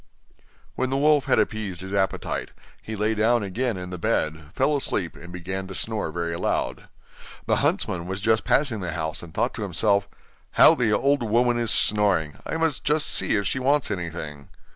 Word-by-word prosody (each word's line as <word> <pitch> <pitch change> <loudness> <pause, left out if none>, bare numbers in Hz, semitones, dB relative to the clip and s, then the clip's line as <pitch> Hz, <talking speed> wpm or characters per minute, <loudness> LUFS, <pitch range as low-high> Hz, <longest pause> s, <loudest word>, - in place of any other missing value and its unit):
When 130 - -1
the 135 - 0
wolf 150 -1 +3
had - - +3
appeased 105 -5 -1
his 95 +1 -7
appetite, 95 -1 -1 0.3
he 110 - -6
lay 105 +2 +1
down 110 +1 +2
again 115 +3 -2
in 90 0 -7
the 90 - -6
bed, 80 -1 -1
fell 150 +9 +1
asleep 100 -10 -1
and 85 +1 -11
began 95 +2 -5
to 95 - -8
snore 110 -6 -2
very 85 0 -3
loud. - - -2 0.6
The - - +2
huntsman 90 -2 0
was 95 +1 -3
just 110 +2 +2
passing 135 -7 +2
the 90 -4 -4
house, 80 0 -3
and 85 - -10
thought 120 +8 0
to - - -7
himself: 100 +1 +1 0.4
'How - - +8
the 120 -4 +1
old 140 +6 +2
woman 120 +2 +2
is 115 -2 0
snoring! 95 -8 +2
I - - -2
must 160 -4 0
just 150 +1 +1
see - - +1
if 100 -1 0
she 130 - -1
wants 140 -1 +1
anything. 80 -6 -5
105 Hz, 190 wpm, -24 LUFS, 90-120 Hz, 0.6 s, How